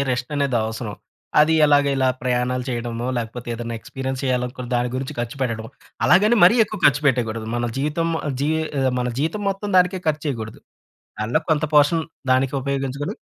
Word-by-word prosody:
రెస్టనేది 130 +1 -1
అవసరం. 110 -1 -5 0.5
అది 155 +2 +4
ఎలాగ 145 -1 +4
ఇలా 130 -1 +2
ప్రయాణాలు 125 0 0
చేయడమో, 120 -1 -3
లేకపోతే 120 +1 -6
ఏదైనా 115 0 -5
ఎక్స్‌పీరియన్స్ 130 +2 -5
చేయాలనుకున్న 125 -1 -2
దాని 120 0 0
గురించి 130 +1 -4
ఖర్చు 120 +3 -4
పెట్టడం. 115 -3 -3 0.4
అలాగని 210 +7 +5
మరీ 210 +7 +6
ఎక్కువ 210 -1 -7
ఖర్చు 145 +1 +3
పెట్టయకూడదు. 115 -4 0
మన 120 0 -1
జీతం 155 +4 0
ఆహ్, 145 - -1
జీ 145 - +1 0.3
ఆహ్, 130 -1 +2
మన 125 - -1
జీతం 165 +8 -1
మొత్తం 195 +1 -4
దానికే 180 +1 +2
ఖర్చేయకూడదు. 140 -8 -3 0.6
దానిలో 110 +3 +1
కొంత 155 -1 +2
పోర్షన్ 155 +2 +4 0.3
దానికి 130 +1 +1
ఉపయోగించుకొని 140 +1 -3
130 Hz, 160 wpm, -22 LUFS, 120-150 Hz, 0.6 s, మరీ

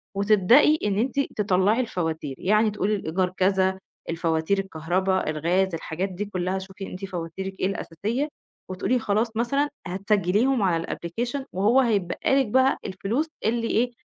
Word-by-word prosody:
وتبدئي 215 +9 +5
إن 200 - 0
أنتِ 260 +4 0 0.2
تطلّعي 200 +3 +3
الفواتير، 160 - -3
يعني 215 +3 +3
تقولي 205 +1 0
الإيجار 185 -1 -1
كذا، 190 0 +2 0.3
الفواتير، 165 +3 0
الكهربا، 185 0 -1
الغاز، 175 +4 +1
الحاجات 165 +4 -3
دي 190 +3 -4
كلّها 185 -1 -2
شوفي 190 +1 -8
أنتِ 185 +2 -6
فواتيرِك 190 +1 -6
إيه - - +1
الأساسية 210 - -3 0.4
وتقولي 200 +7 0
خلاص 220 +2 0
مثلًا 275 +5 +1 0.2
هتسجليهم 205 +6 +1
على 170 -3 +1
الapplication 240 +10 -3
وهو 210 +8 +3
هيتبقى 200 -8 0
لِك 265 -4 +2 0.3
الفلوس 225 - -2 0.2
اللي 230 +1 +1
إيه، 245 +2 +1
195 Hz, 135 wpm, -25 LUFS, 180-225 Hz, 0.4 s, وتبدئي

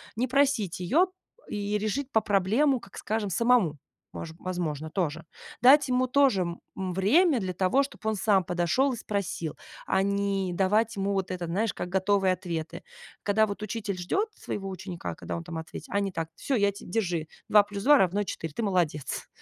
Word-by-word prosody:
не 245 +4 0
просить 260 -10 +1
её 305 - +3 0.4
и 205 0 -2
решить 230 +7 -2
па 220 - +3
проблему, 220 +8 +2
как 195 -4 -14
скажем, 215 -1 -2
самому, 230 -9 +3 0.4
мож 160 -1 -7
возможно, 160 -4 -3
тоже. 165 -2 -2 0.4
Дать 280 +3 +7
ему 255 0 +2
тоже, 255 -7 +3
м, 170 -1 -4 0.3
время 265 - +4
для 185 -3 -3
того, 185 +10 +2
чтоб 275 - -10
он 220 - +1
сам 195 -1 +3
подошёл 180 +11 +1
и - - -5
спросил, 195 -7 -3 0.3
а 190 - +2
не 200 -1 0
давать 210 +5 +2
ему 200 0 -1
вот 195 -2 -1
это, 180 -1 -3
знаешь, 200 +6 -1
как 180 - -4
готовые 190 0 +2
ответы. 170 -4 -5 0.4
Когда 215 +1 +3
вот 200 +1 -6
учитель 215 -2 -3
ждёт 390 - 0
своего 195 -1 -5
ученика, 185 -2 -6
когда - - -5
он 165 - -6
там 165 -1 -6
ответит, 160 - -8
а 200 - +2
не 195 -1 -1
так: 165 -2 -4
"Всё, 270 - -1
я 200 -2 +3
те 200 - -12
держи 175 -5 -1 0.2
2+2 205 +7 +5
равно 195 +3 +2
4, 165 -4 -5
ты 230 - -3
молодец". 175 -8 -1
200 Hz, 180 wpm, -27 LUFS, 180-225 Hz, 0.4 s, Дать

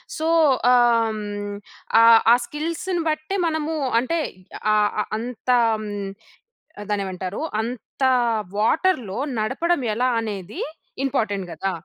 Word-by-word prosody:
So, 315 0 -2 0.4
ఆహ్, 240 -2 +4
హ్మ్. 205 -1 -5 0.5
ఆహ్, 230 0 +8
ఆ - - +9
స్కిల్స్‌ని 335 +5 -3
బట్టే 310 +5 -2
మనము 315 0 -2 0.3
అంటే 295 +8 -1 0.5
ఆహ్, 210 -1 +3
అ - - 0
అంతా 245 +2 0 1.3
దాన్నేమంటారు? 190 0 -3 0.2
అంత 240 +3 -6 0.5
వాటర్‌లో 230 - +1 0.2
నడపడం 275 +9 0
ఎలా 250 +4 +1
అనేది 205 -2 -6 0.5
ఇంపార్టెంట్ 205 -7 -1
కదా! 190 +4 -2
230 Hz, 100 wpm, -22 LUFS, 205-300 Hz, 1.3 s, ఆ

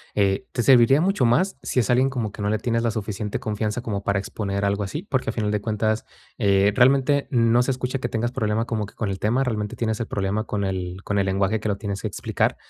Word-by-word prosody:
eh 100 -2 +1
te 120 - 0
serviría 130 +3 +6
mucho 185 -7 +2
más 180 +12 +2
si 125 - -1
es 110 - -3
alguien 130 +2 +4
como 115 -6 -3
que 105 - -9
no 105 - 0
le 110 - +1
tienes 115 +1 -1
la 115 - +1
suficiente 105 -1 -3
confianza 110 +2 -2
como 105 -5 -3
para 100 0 +1
exponer 100 0 -3
algo 100 +1 +1
así, 150 - -5
porque 135 -11 -1
a - - -2
final 105 -2 -1
de 105 - 0
cuentas, 110 0 -1 0.3
eh, 100 0 +3
realmente 135 +2 +4
no 120 -1 +4
se 135 - 0
escucha 125 +1 -2
que 120 - -2
tengas 120 +2 -1
problema 110 -2 0
como 110 -3 -2
que - - -15
con 105 -3 -2
el 95 -1 -4
tema, 120 +6 +1
realmente 105 -4 -2
tienes 110 -1 -1
el 115 - -3
problema 100 +3 -1
con 105 -1 -2
el 95 -1 -3
con 100 -1 0
el 95 - +2
lenguaje 100 +3 +1
que - - -4
lo 100 - +1
tienes 100 0 -4
explicar. 105 - -1
110 Hz, 245 wpm, -23 LUFS, 100-120 Hz, 0.3 s, serviría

